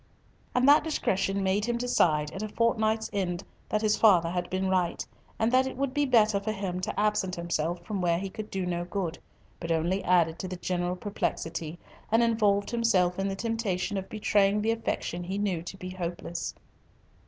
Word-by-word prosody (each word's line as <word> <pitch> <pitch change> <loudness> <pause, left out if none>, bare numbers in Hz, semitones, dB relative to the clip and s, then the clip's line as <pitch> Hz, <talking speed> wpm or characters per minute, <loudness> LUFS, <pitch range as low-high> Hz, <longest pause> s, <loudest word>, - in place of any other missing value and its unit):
And 250 +2 +4
that 290 +1 +7
discretion 195 -10 0
made 195 +2 +1
him 240 0 0
decide 155 -11 +2
at 195 - -6
a 215 - -3
fortnight's 220 -1 +1
end 175 -3 -1 0.3
that 215 0 0
his 215 -1 +3
father 175 -6 +5
had 175 0 -2
been 190 +1 -1
right, 185 -2 0 0.3
and 225 +1 +1
that 260 +1 +4
it 260 - -6
would 275 -1 -1
be 290 0 +1
better 215 -5 +4
for 210 +2 -2
him 195 -4 -3
to 185 - -3
absent 210 -3 +1
himself 170 0 -2
from 205 -3 -3
where 170 -1 +2
he 195 +3 -3
could 215 +2 -7
do 190 -1 -2
no 175 -1 -1
good, 175 -2 -3 0.4
but 165 -1 -4
only 170 +4 +1
added 170 -2 +3
to 185 - -4
the 185 - -5
general 180 0 -2
perplexity, 170 -4 -3 0.3
and 225 +2 +5
involved 210 -3 +2
himself 195 -7 +2
in 195 - 0
the 195 - -2
temptation 205 -3 -2
of 190 -1 -4
betraying 205 -1 +2
the 225 - +2
affection 200 -6 -2
he 190 +2 -3
knew 195 -5 0
to 175 +3 -8
be 185 -1 -7
hopeless. 175 -2 -4
195 Hz, 195 wpm, -28 LUFS, 175-215 Hz, 0.4 s, that